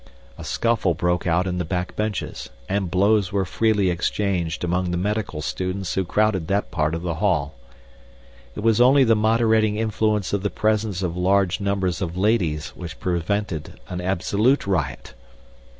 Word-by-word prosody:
A - - -10
scuffle 110 -7 0
broke 90 +2 0
out 85 +2 +2
in 90 -1 -2
the - - 0
back 90 +2 -3
benches, 105 -1 -3 0.2
and 95 -2 -1
blows 100 +1 +2
were 95 -1 0
freely 105 -1 +1
exchanged 90 -1 -1
among 90 +1 0
the 90 - -1
medical 100 -5 -2
students 95 +3 -3
who 95 - 0
crowded 95 -2 +1
that 100 +1 -1
part 75 -2 0
of 85 - -5
the 85 -2 -1
hall. 80 -8 +1 1.0
It - - -5
was 115 +1 +3
only 135 +3 +6
the 115 -2 +4
moderating 110 0 +2
influence 110 -2 0
of 100 - +1
the 100 - -1
presence 105 -3 0
of 85 -2 -2
large 95 +1 +2
numbers 100 -2 -1
of 85 -1 -3
ladies 95 -7 +1
which 85 -3 -9
prevented 90 -1 -2
an 90 0 -4
absolute 100 +8 +1
riot. 95 -6 -2
95 Hz, 165 wpm, -23 LUFS, 90-105 Hz, 1.0 s, only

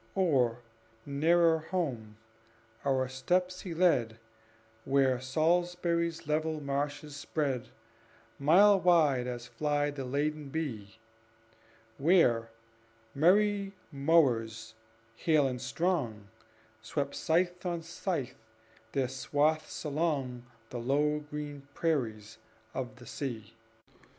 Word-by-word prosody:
Or, 130 -11 +2 0.4
nearer 160 +3 +3
home, 135 - -3 0.7
our 130 -2 +1
steps 180 +8 -1
he 175 -4 -6
led 125 -11 +2 0.7
Where 135 -2 +2
Salisbury's 170 +3 0
level 155 +1 0
marshes 145 +1 -3
spread 140 -3 -2 0.7
Mile 195 +8 +6
wide 155 -8 +3
as 120 -1 -5
flies 145 +2 -1
the 140 -2 -5
laden 145 +3 -2
bee; 115 -10 -5 1.0
Where 135 -8 +4 0.6
merry 200 +5 +3 0.2
mowers, 120 -7 +2 0.4
hale 155 -4 +3
and 125 -2 -4
strong, 125 - -1 0.5
Swept, 140 +2 -3
scythe 175 +2 0
on 170 -2 -2
scythe, 165 -6 -3 0.6
their 135 -2 +1
swaths 145 +4 0
along 140 -5 -1 0.2
The 125 - -4
low 145 +5 +1
green 145 -1 -7
prairies 110 -9 -2 0.3
of 130 -1 -4
the 125 -1 -14
sea. 115 -6 -6
145 Hz, 95 wpm, -31 LUFS, 130-165 Hz, 1.0 s, Mile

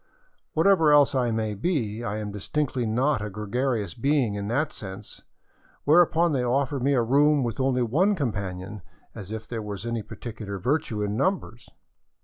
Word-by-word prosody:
Whatever 165 -2 +4
else 145 -1 +5
I 125 -3 +1
may 110 -1 -1
be, 115 - -2
I 105 -1 -3
am 105 -1 -4
distinctly 125 +4 -2
not 130 +3 +1
a 105 - -3
gregarious 105 -1 -2
being 135 - +1
in 100 0 -4
that 145 +7 0
sense; 95 -2 -9 0.6
whereupon 170 +1 +4
they 130 -4 0
offered 135 +2 0
me 140 +3 +2
a 120 - +3
room 145 +4 +3
with 120 +1 -3
only 130 -1 +2
one 175 - +2
companion, 100 - -4 0.3
as 100 +1 -9
if 110 0 -6
there 115 -2 -4
were 105 -1 -5
any 115 -1 -2
particular 110 -1 -7
virtue 115 - -1
in 105 0 -2
numbers 135 - -2
120 Hz, 165 wpm, -26 LUFS, 105-145 Hz, 0.6 s, else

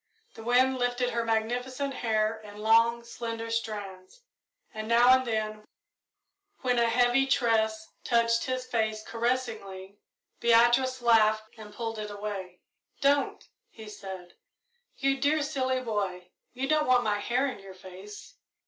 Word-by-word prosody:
The - - -11
wind 255 +3 +2
lifted 245 0 0
her 235 0 -1
magnificent 245 +5 -2
hair 220 -2 0
in 210 -1 -12
long, 230 +2 +3
slender 230 -1 -6
strands, 210 - -5 0.5
and 215 0 -6
now 235 +2 +5
and 260 0 +5
then, 215 -1 -2 1.0
when 250 -1 +1
a 235 0 +3
heavy 245 +3 +3
tress 220 -4 +1 0.2
touched 230 -1 +2
his 255 -1 -3
face 220 -3 -1
caressingly, 220 -5 -3 0.4
Beatrice 240 +2 +3
laughed 220 -2 +3
and 215 -2 -11
pulled 225 +1 -5
it 210 0 -5
away. 200 -3 -6 0.4
"Don't!" 280 0 +1 0.2
he 220 -1 -12
said. 190 -4 -9 0.6
"You 275 0 0
dear, 295 +2 +2
silly 260 -2 -1
boy, 190 -6 -3 0.2
you 260 +2 -3
don't 305 0 +2
want 250 -1 +4
my 210 -2 0
hair 245 +5 0
in 265 -6 -4
your 195 -1 -12
face." 190 +2 -12
230 Hz, 140 wpm, -28 LUFS, 215-250 Hz, 1.0 s, now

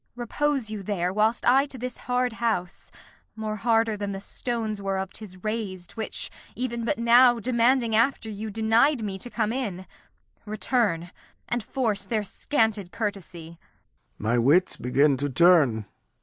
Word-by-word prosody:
Repose 250 0 -1
you 215 -2 -4
there, 185 -2 -2
whilst 215 +3 +1
I 270 +3 +5
to 270 - -9
this 250 0 -5
hard 250 -1 +1
house 225 -7 -2 0.4
(More 215 -1 -4
harder 225 0 +2
than 205 -1 -4
the 195 - -5
stones 220 0 -3
whereof 190 -1 -3
'tis 200 -4 -9
rais'd, 205 -5 -4
Which 220 -1 -4 0.2
even 235 -2 -3
but 295 - 0
now, 240 +1 +6
demanding 235 0 +2
after 230 +1 +2
you, 215 0 -5
Denied 225 +5 +2
me 195 -2 -4
to 245 - -7
come 225 -2 -1
in) 200 -8 -3 0.6
return, 210 -5 -1 0.4
and 240 0 -1
force 220 -4 -1
Their 220 -3 0
scanted 215 -4 0
courtesy. 175 -6 -5 0.6
Lear. 110 +2 -2
My 120 - +3
wits 150 +10 +3
begin 140 +3 +2
to 145 +2 -2
turn. 140 - +4
220 Hz, 150 wpm, -26 LUFS, 190-235 Hz, 0.6 s, now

